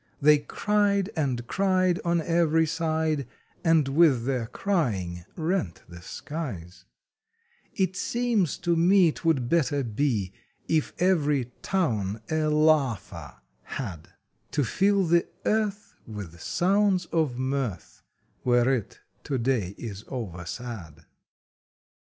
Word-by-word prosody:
They 150 +1 +6
cried 200 +5 +1
and 130 -7 -1
cried 185 +2 +2
On 170 -1 +1
every 165 -1 +3
side, 160 -3 -1 0.4
And 165 -4 +4
with 140 -5 +4
their 125 -4 -1
crying 100 - -1
rent 160 - -2
the 85 0 -11
skies 95 - -7 0.9
It 190 -1 0
seems 235 - 0
to 170 -1 +3
me 175 0 +5
Twould 150 -7 0
better 145 -1 +1
be 115 -4 -1 0.3
If 155 -2 0
every 150 -8 +2
TOWN 110 - 0
a 155 -1 +1
LAUGHER 150 - +1 0.4
had 90 - -6 0.4
To 145 - 0
fill 195 - +2
the 170 +1 +3 0.2
earth 210 -1 0
With 100 -7 -8
sounds 190 - +2
of 155 -7 0
mirth 130 -8 -3 0.4
Where 120 +1 +3
it 115 -7 -4 0.2
to 140 - -1
day 115 -6 0
is 105 -3 -7
oversad. 90 - -7
145 Hz, 110 wpm, -26 LUFS, 115-170 Hz, 0.9 s, They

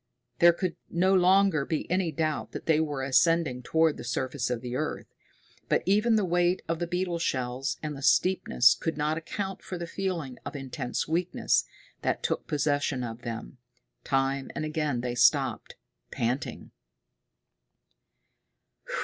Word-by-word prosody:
There 170 0 +8
could 175 0 -3
no 185 +3 +2
longer 185 -3 +4
be 155 +2 -2
any 180 -2 +1
doubt 155 0 -2
that - - -6
they 160 -1 +3
were 145 -4 -1
ascending 140 -1 +2
toward 160 +4 +2
the - - -7
surface 130 +1 -2
of 120 -2 -2
the 125 0 -5
earth. 155 +3 -3 0.6
But - - +2
even 215 +4 +3
the 210 -3 +2
weight 175 +1 +1
of 165 0 -1
the 175 - -2
beetle 180 -1 -1
shells 130 -3 -2
and 150 -1 -3
the 135 - -8
steepness 135 -3 +4
could 165 -2 -3
not 155 +2 0
account 195 +3 -5
for 185 - -6
the 170 - -4
feeling 170 -8 -4
of - - -7
intense 135 -2 -3
weakness 170 +3 +1 0.4
that - - -1
took - - -1
possession 145 -3 0
of 115 0 -6
them. 115 - -7 0.4
Time 135 0 0
and 155 - -2
again 150 -5 -1
they 125 0 -2
stopped, 120 0 +2 0.3
panting. 120 +4 -3
155 Hz, 150 wpm, -28 LUFS, 130-175 Hz, 0.6 s, There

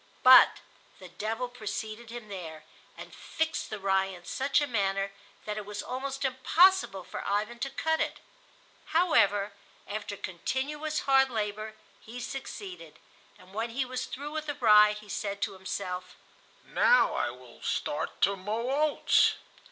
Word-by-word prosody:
But 255 0 +8 0.4
the 185 -2 -12
devil 225 +7 -3
preceded 220 -1 -6
him 235 -2 -8
there, 165 -6 -8 0.3
and - - -10
fixed 320 0 -3
the 215 - -4
rye 195 0 +2
in 180 -2 -10
such 275 +7 +1
a 295 - +1
manner 195 -5 0 0.3
that 210 0 -3
it 215 - -4
was 205 0 -5
almost 275 +2 -4
impossible 265 - +3
for - - -7
Ivan 210 +4 -1
to 275 - -2
cut 320 +4 0
it; - - -2 0.8
however, 205 - +3 0.3
after 205 -1 -5
continuous 295 - -3
hard 270 -1 +4
labor 215 -1 -3 0.2
he 235 +3 -9
succeeded, 195 - -7 0.4
and 185 +1 -18
when 225 +3 -2
he 260 +3 -1
was 255 0 -4
through 290 +3 -6
with 310 0 -4
the 290 - -2
rye 210 -5 +6
he 210 0 -11
said 200 0 -3
to 205 -1 -2
himself: 185 -1 -5 0.5
"Now - - +4
I - - 0
will - - -13
start - - -3
to 200 - +4
mow 215 +6 -3
oats." 300 +1 +3
220 Hz, 150 wpm, -29 LUFS, 200-270 Hz, 0.8 s, But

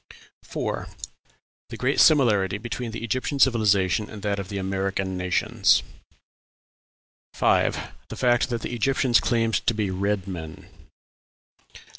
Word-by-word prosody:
4. - - -4 0.8
The - - -7
great - - 0
similarity 105 -10 +4
between 120 +2 -5
the 115 - -7
Egyptian 130 +5 -2
civilization 105 -6 +2
and 105 -2 -10
that 100 -1 -1
of 95 -1 -6
the 100 - -4
American 95 0 -2
nations. 90 -1 +2 1.5
5. - - +2 0.3
The - - -6
fact 120 0 +2
that 120 -2 -3
the - - -4
Egyptians 125 +1 +2
claimed 115 -1 0
to 115 - +3
be 105 -3 -1
red 100 +1 -1
men. 80 -4 -7
105 Hz, 125 wpm, -24 LUFS, 95-120 Hz, 1.5 s, similarity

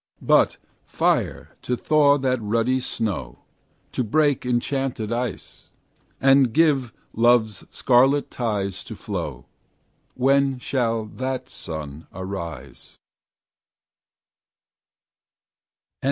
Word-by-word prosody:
But - - +4 0.3
fire - - -1
to 125 - -2
thaw 145 0 +4
that 130 -3 0
ruddy 115 +4 +1
snow, 95 - -4 0.5
To 125 - -1
break 145 +2 +1
enchanted 125 -2 -1
ice, 120 +1 -4 0.5
And 135 -2 +5
give 140 -5 +2 0.2
love's 115 -3 +2
scarlet 135 +3 +3
tides 100 -5 -2
to 110 - -8
flow, 85 - -5 0.7
When 135 +1 +2
shall 115 -3 -1
that 130 +3 -4
sun 80 -2 -7
arise? 85 -8 -7
120 Hz, 85 wpm, -23 LUFS, 100-135 Hz, 0.7 s, And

